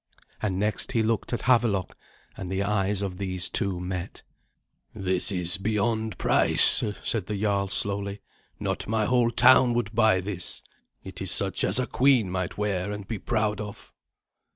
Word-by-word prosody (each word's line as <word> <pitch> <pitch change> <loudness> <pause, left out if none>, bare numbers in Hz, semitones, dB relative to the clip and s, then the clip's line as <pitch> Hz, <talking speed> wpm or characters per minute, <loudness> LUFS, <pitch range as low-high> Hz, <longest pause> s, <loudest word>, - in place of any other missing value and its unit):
And 100 -4 -1
next 105 +2 -2
he 115 - +2
looked 110 -1 -1
at 120 - -3
Havelok, 115 -7 +1 0.4
and 95 -2 -7
the 95 +1 -1
eyes 100 0 0
of 95 -2 -5
these 95 -2 -2
two 95 -3 -1
met. 90 0 -6 0.7
"This 95 -1 0
is 90 -1 +1
beyond 110 0 -1
price," - - +4 0.2
said 105 -6 -1
the 105 -2 -3
jarl 100 -1 0
slowly. 100 +1 -1 0.4
"Not - - -3
my 110 0 0
whole 120 0 +2
town 125 +1 +5
would 115 -3 -2
buy 110 -4 +3
this. 95 -1 -4 0.4
It - - -9
is - - -3
such - - +2
as 100 - +1
a 130 - +1
queen 125 -9 +2
might 90 -1 -3
wear 100 -2 -2
and 105 -2 -7
be 110 -3 -4
proud 105 0 -1
of." 105 -1 -9
100 Hz, 165 wpm, -26 LUFS, 95-110 Hz, 0.7 s, town